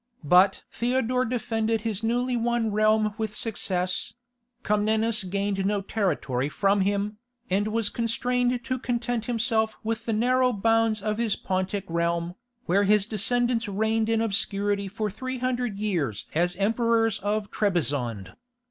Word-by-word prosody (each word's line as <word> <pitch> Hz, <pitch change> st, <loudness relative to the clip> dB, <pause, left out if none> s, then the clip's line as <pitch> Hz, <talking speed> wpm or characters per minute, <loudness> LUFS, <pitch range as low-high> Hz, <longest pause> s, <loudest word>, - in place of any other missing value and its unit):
But 180 Hz, +6 st, +4 dB
Theodore 250 Hz, +1 st, 0 dB
defended 225 Hz, -2 st, -1 dB
his 215 Hz, -2 st, -2 dB
newly 245 Hz, +2 st, 0 dB
won 235 Hz, -1 st, 0 dB
realm 215 Hz, 0 st, +2 dB
with 220 Hz, -1 st, -3 dB
success; 185 Hz, -5 st, -2 dB, 0.5 s
Comnenus 215 Hz, +1 st, +2 dB
gained 195 Hz, +1 st, -1 dB
no 200 Hz, +1 st, 0 dB
territory 150 Hz, -, -1 dB
from 195 Hz, +5 st, +2 dB
him, 205 Hz, +2 st, -1 dB, 0.3 s
and 200 Hz, +3 st, +2 dB
was 220 Hz, -1 st, 0 dB
constrained 245 Hz, +1 st, 0 dB
to 255 Hz, -1 st, -2 dB
content 240 Hz, -1 st, -2 dB
himself 225 Hz, -2 st, 0 dB
with 225 Hz, +1 st, -3 dB
the 225 Hz, -, +1 dB
narrow 250 Hz, +3 st, +2 dB
bounds 225 Hz, 0 st, +2 dB
of 215 Hz, 0 st, -1 dB
his 230 Hz, -3 st, +1 dB
Pontic 190 Hz, +1 st, -2 dB
realm, 170 Hz, +1 st, -1 dB, 0.3 s
where 200 Hz, +3 st, +2 dB
his 210 Hz, 0 st, +3 dB
descendants 235 Hz, +2 st, +1 dB
reigned 220 Hz, +2 st, 0 dB
in 225 Hz, 0 st, +2 dB
obscurity 200 Hz, -2 st, 0 dB
for 210 Hz, +1 st, -3 dB
three 255 Hz, +5 st, -5 dB
hundred 245 Hz, -4 st, -2 dB
years 170 Hz, -, -2 dB
as 175 Hz, +3 st, +1 dB
emperors 225 Hz, +2 st, +1 dB
of 205 Hz, +1 st, -2 dB
Trebizond. 140 Hz, -, -1 dB
215 Hz, 140 wpm, -26 LUFS, 195-230 Hz, 0.5 s, But